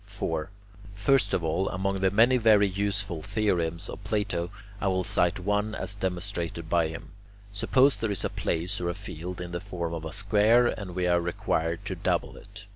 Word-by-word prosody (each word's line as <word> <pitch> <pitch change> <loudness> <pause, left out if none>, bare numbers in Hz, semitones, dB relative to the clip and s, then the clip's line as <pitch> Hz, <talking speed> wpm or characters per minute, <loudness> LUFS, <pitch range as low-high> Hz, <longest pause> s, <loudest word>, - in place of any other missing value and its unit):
4. 80 +2 -3 0.5
First 135 +7 +2
of 85 - 0
all, 85 +4 0
among 95 +1 -1
the 95 - +4
many 115 +6 +5
very 105 -3 +5
useful 100 -3 -2
theorems 85 -5 0
of - - -8
Plato, 100 -5 -1 0.3
I 100 - +1
will 95 -1 +1
cite 90 +1 +1
one 105 +3 0
as 100 - -4
demonstrated 90 -3 -3
by 85 0 +2
him. 80 +1 -8 0.4
Suppose 130 +6 +4
there 105 +2 -2
is 100 - -1
a - - 0
place 90 +4 -1
or 85 - -1
a 85 - -3
field 90 +3 -7
in 90 -1 -6
the 85 +1 -3
form 85 -4 -4
of 80 -1 -4
a 80 - -5
square 105 +5 +4
and 100 -6 -3
we 90 -1 0
are 85 -1 +3
required 85 -1 -1
to - - -3
double - - -1
it. - - -12
95 Hz, 195 wpm, -27 LUFS, 85-105 Hz, 0.5 s, many